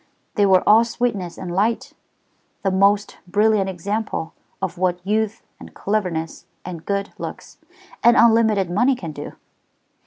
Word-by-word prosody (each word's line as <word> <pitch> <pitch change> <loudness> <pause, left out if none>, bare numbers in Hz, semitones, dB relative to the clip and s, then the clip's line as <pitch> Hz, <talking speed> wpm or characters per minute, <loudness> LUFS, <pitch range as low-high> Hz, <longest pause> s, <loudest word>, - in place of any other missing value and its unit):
They 205 -2 +3
were 185 -1 +4
all 220 +2 +7
sweetness 225 -7 -2
and 175 -2 -6
light; 215 +5 0 0.7
the 195 - +1
most 200 +2 +2
brilliant 205 0 +2
example 195 -1 -3 0.3
of 180 -2 -4
what 180 -1 +1
youth, 215 +1 -1 0.2
and - - -13
cleverness, 180 -6 -2 0.2
and 175 -3 -7
good 200 0 -2
looks, - - -8 0.4
and 235 0 +6
unlimited 220 -4 +4
money 245 +8 +3
can 170 -10 -7
do. - - -8
200 Hz, 135 wpm, -21 LUFS, 180-220 Hz, 0.7 s, all